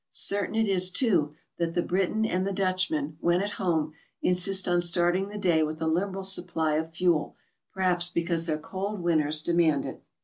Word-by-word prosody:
Certain 200 +2 +2
it 225 -1 +1
is, 185 -2 +5
too, 185 - +1 0.2
that 165 -1 -2
the 175 - 0
Briton 195 +4 -1
and 185 -2 -2
the - - -2
Dutchman, 185 -6 -1
when 175 +1 +1
at 205 +2 -3
home, 160 -4 -1 0.3
insist 185 +1 +3
on 175 0 +1
starting 175 +3 +1
the 210 - -8
day 175 -5 +1
with 155 0 -3
a 160 - -3
liberal 190 +4 -2
supply 175 -4 +1
of 160 +1 -3
fuel, 170 -2 -1 0.4
perhaps 180 -2 0
because 170 -1 -1
their 155 -2 -1
cold 190 +5 -6
winters 155 -2 +2
demand 165 -5 +1
it. - - -8
175 Hz, 180 wpm, -26 LUFS, 160-190 Hz, 0.4 s, is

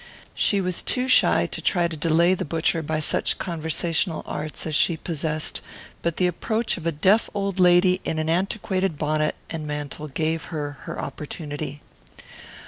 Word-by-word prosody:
She 200 -1 +3
was 180 -1 0
too 255 0 0
shy 260 - +5
to - - -5
try 175 -3 +2
to 165 - -5
delay 165 +3 +3
the 185 - -2
butcher 165 +1 0
by 155 0 -2
such - - 0
conversational 165 0 -1
arts 150 -1 -5
as 155 -2 -1
she 165 +2 +3
possessed, 155 -2 -2 0.4
but 170 -1 -1
the 180 - +2
approach 220 +6 0
of 170 -2 -5
a - - +2
deaf 190 +9 +3
old 195 -2 -2
lady 180 +1 +5
in 160 - -2
an 155 0 -1
antiquated 190 0 0
bonnet 155 +1 0 0.2
and 155 -2 -4
mantle 150 0 -4
gave 160 +3 -1
her 145 -3 -5
her - - -5
opportunity. 145 0 -6
165 Hz, 165 wpm, -24 LUFS, 155-180 Hz, 0.4 s, shy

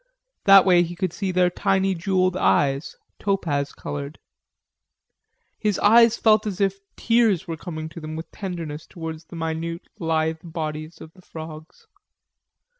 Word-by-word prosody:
That 195 -1 +8
way 180 -2 +6
he 175 0 -3
could 185 -1 -2
see 195 -2 -3
their 180 0 +3
tiny 195 +1 +1
jewelled 185 0 +1
eyes, 135 - +1 0.2
topaz 160 -8 -1
colored. 145 +1 -6 1.4
His 210 -3 0
eyes 230 +2 +6
felt 215 -1 +3
as 195 -2 -4
if 195 -1 +1 0.2
tears 225 -6 +2
were 165 - -3
coming 155 -1 -6
to 165 - -10
them 155 0 -6
with 160 +1 -7
tenderness 170 -5 -6
towards 160 -1 -7
the 165 - -12
minute 165 +1 -4
lithe 160 -1 0
bodies 155 -1 -5
of 160 - -11
the 185 - -18
frogs. 160 - -10
170 Hz, 145 wpm, -23 LUFS, 160-195 Hz, 1.4 s, That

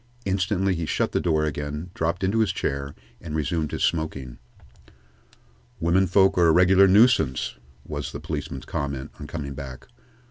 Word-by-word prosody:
Instantly 95 0 +1
he 85 -2 -3
shut - - 0
the - - +1
door 80 -3 +1
again, 75 +3 -4
dropped 85 +3 -2
into 100 +4 +1
his 110 -4 +2
chair, 70 +1 -3 0.3
and 80 -2 -6
resumed 80 0 -1
his - - -2
smoking. 75 -7 -2 1.4
"Women 90 +3 +2
folks 95 +1 +4
are 85 - +5
a - - +6
regular 95 +3 +6
nuisance," 95 - +3 0.3
was 75 -1 -5
the - - -6
policeman's - - -5
comment, 70 -2 -4
on 75 - -7
coming 70 -4 -5
back. 65 -2 -8
80 Hz, 155 wpm, -24 LUFS, 75-95 Hz, 1.4 s, a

